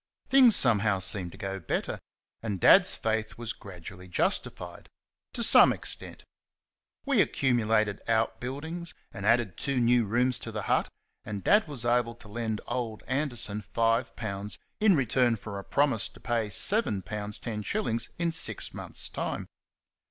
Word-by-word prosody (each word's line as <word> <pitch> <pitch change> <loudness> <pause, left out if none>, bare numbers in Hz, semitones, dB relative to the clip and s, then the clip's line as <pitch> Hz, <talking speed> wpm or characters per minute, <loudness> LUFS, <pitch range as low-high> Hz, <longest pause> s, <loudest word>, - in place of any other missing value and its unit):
Things 255 -4 +7
somehow 105 -5 +3
seemed 95 -1 -2
to - - -12
go 95 0 -4
better; 85 - -3 0.4
and 105 -4 -3
Dad's - - +6
faith 110 -1 -2
was 115 -1 -4
gradually 90 -2 -10
justified 90 0 -2 0.4
to - - -2
some - - +7
extent. - - -6 0.8
We - - +4
accumulated 110 -5 +1
out 115 -1 +1
buildings 160 +6 -6 0.2
and 100 +1 -4
added 115 -7 +2
two 140 -2 -1
new 120 -1 +4
rooms 125 +4 +1
to 115 - -7
the 105 -2 -4
hut, - - +1 0.3
and 100 -2 -6
Dad 205 -3 +4
was 135 -6 -3
able 120 -1 +1
to 120 -2 -15
lend 110 0 -3
old 115 -4 -4
Anderson 120 -6 -2
five 115 +3 0
pounds 100 -2 -4 0.2
in 210 -3 +5
return 125 -3 +2
for 100 -2 -7
a - - -8
promise 140 -4 +1
to - - -17
pay 115 -3 -1
seven 105 - +1
pounds 105 +1 -4
ten 110 -2 -5
shillings 115 - -2
in 170 0 0
six 160 - -3
months' - - -7
time. - - -4
115 Hz, 155 wpm, -28 LUFS, 105-125 Hz, 0.8 s, Things